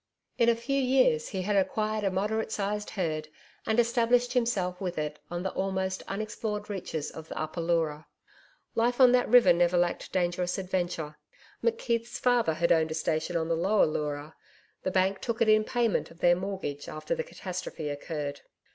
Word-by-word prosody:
In 235 Hz, 0 st, +5 dB
a 235 Hz, -, +4 dB
few 275 Hz, +4 st, -1 dB
years 255 Hz, -12 st, +3 dB
he 190 Hz, -1 st, -3 dB
had 205 Hz, +2 st, 0 dB
acquired 215 Hz, +2 st, 0 dB
a 195 Hz, -, +2 dB
moderate 210 Hz, +4 st, -1 dB
sized 210 Hz, 0 st, -2 dB
herd 155 Hz, -5 st, -2 dB, 0.4 s
and 220 Hz, +2 st, +2 dB
established 240 Hz, +1 st, +3 dB
himself 200 Hz, -8 st, 0 dB
with 180 Hz, -2 st, -3 dB
it 150 Hz, 0 st, -3 dB
on 175 Hz, +1 st, -4 dB
the 190 Hz, -, -1 dB
almost 190 Hz, -1 st, -2 dB
unexplored 210 Hz, 0 st, -4 dB
reaches 170 Hz, -6 st, -4 dB
of 160 Hz, 0 st, -9 dB
the -, -, -6 dB
Upper 155 Hz, +2 st, -3 dB
Leura. 160 Hz, -3 st, 0 dB, 0.7 s
Life 240 Hz, +2 st, +1 dB
on 255 Hz, -2 st, +8 dB
that 250 Hz, 0 st, +3 dB
river 230 Hz, -7 st, +7 dB
never 175 Hz, +1 st, +3 dB
lacked 175 Hz, 0 st, 0 dB
dangerous 180 Hz, 0 st, 0 dB
adventure. 175 Hz, -5 st, -3 dB, 0.4 s
McKeith's 240 Hz, -, 0 dB
father 240 Hz, -10 st, +2 dB
had 170 Hz, +2 st, +1 dB
owned 160 Hz, -1 st, +4 dB
a 160 Hz, -, -3 dB
station 160 Hz, +2 st, -1 dB
on 160 Hz, -1 st, -1 dB
the 165 Hz, -, +1 dB
Lower 195 Hz, +6 st, +3 dB
Leura 150 Hz, 0 st, -3 dB, 0.5 s
the -, -, -1 dB
bank 190 Hz, +1 st, +1 dB
took 235 Hz, -1 st, -3 dB
it 230 Hz, -, +3 dB
in 215 Hz, 0 st, +5 dB
payment 235 Hz, -1 st, 0 dB
of 165 Hz, -, -16 dB
their 175 Hz, 0 st, +4 dB
mortgage 185 Hz, -6 st, -4 dB
after 155 Hz, -, -3 dB
the 485 Hz, -1 st, -2 dB
catastrophe 185 Hz, -, -6 dB
occurred. 145 Hz, 0 st, -4 dB
190 Hz, 180 wpm, -29 LUFS, 165-220 Hz, 0.7 s, on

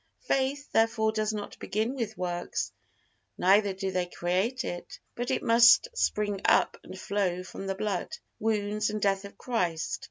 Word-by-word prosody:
Faith, 275 Hz, +2 st, -1 dB
therefore, 225 Hz, -1 st, +2 dB
does 215 Hz, 0 st, 0 dB
not 210 Hz, -1 st, -6 dB
begin 220 Hz, +5 st, -1 dB
with 225 Hz, -5 st, -4 dB
works, 175 Hz, -1 st, -3 dB, 0.7 s
neither 200 Hz, +2 st, +4 dB
do 190 Hz, 0 st, -3 dB
they 180 Hz, -1 st, -1 dB
create 190 Hz, +10 st, -1 dB
it, 175 Hz, 0 st, -6 dB, 0.2 s
but 245 Hz, +1 st, -4 dB
it 260 Hz, -, 0 dB
must 235 Hz, -, +6 dB
spring 205 Hz, -, 0 dB
up -, -, +4 dB
and 185 Hz, -, -10 dB
flow 185 Hz, -3 st, -1 dB
from 195 Hz, +1 st, -8 dB
the 195 Hz, -, -1 dB
blood, 200 Hz, -, -2 dB, 0.3 s
wounds 210 Hz, -1 st, 0 dB
and 215 Hz, 0 st, -2 dB
death 195 Hz, -1 st, +1 dB
of 200 Hz, -, -11 dB
Christ. 195 Hz, 0 st, -1 dB
210 Hz, 160 wpm, -28 LUFS, 190-225 Hz, 0.7 s, must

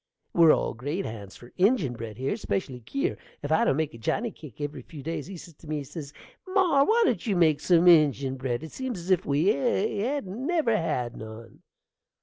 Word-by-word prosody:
We're 165 Hz, -2 st, +7 dB
all -, -, +1 dB
great 145 Hz, +11 st, -3 dB
hands 105 Hz, -3 st, -7 dB
for 120 Hz, -, -15 dB
injin 190 Hz, -, +3 dB
bread 115 Hz, -3 st, -7 dB
here, 135 Hz, +8 st, -1 dB
'specially 150 Hz, -, -3 dB
Kier. 275 Hz, -, -2 dB, 0.3 s
If 145 Hz, -, -3 dB
I 160 Hz, -, +4 dB
don't -, -, +2 dB
make 155 Hz, -2 st, -1 dB
a 115 Hz, -, -11 dB
johnny 220 Hz, -, -1 dB
cake 150 Hz, -, -13 dB
every 145 Hz, 0 st, -4 dB
few 155 Hz, -5 st, -11 dB
days 165 Hz, +3 st, -4 dB
he 190 Hz, -1 st, -8 dB
says 170 Hz, 0 st, -12 dB
to 160 Hz, -, -15 dB
me, 150 Hz, -1 st, -2 dB
says 145 Hz, +1 st, -8 dB, 0.4 s
he, 370 Hz, -, -8 dB
"Mar, 345 Hz, -8 st, +4 dB
why 460 Hz, +2 st, +4 dB
don't 265 Hz, -, 0 dB
you 205 Hz, -, +1 dB
make 160 Hz, -4 st, +4 dB
some 175 Hz, +2 st, +4 dB
injin 140 Hz, -6 st, +5 dB
bread? 130 Hz, 0 st, -3 dB
it 160 Hz, -, -8 dB
seems 260 Hz, -5 st, -4 dB
as 175 Hz, +2 st, -4 dB
if 185 Hz, -1 st, +2 dB
we 145 Hz, +7 st, +2 dB
hadn't 230 Hz, +1 st, -1 dB
never 315 Hz, -10 st, +2 dB
had 140 Hz, -, -1 dB
none." 110 Hz, +1 st, -10 dB
160 Hz, 210 wpm, -27 LUFS, 135-210 Hz, 0.4 s, We're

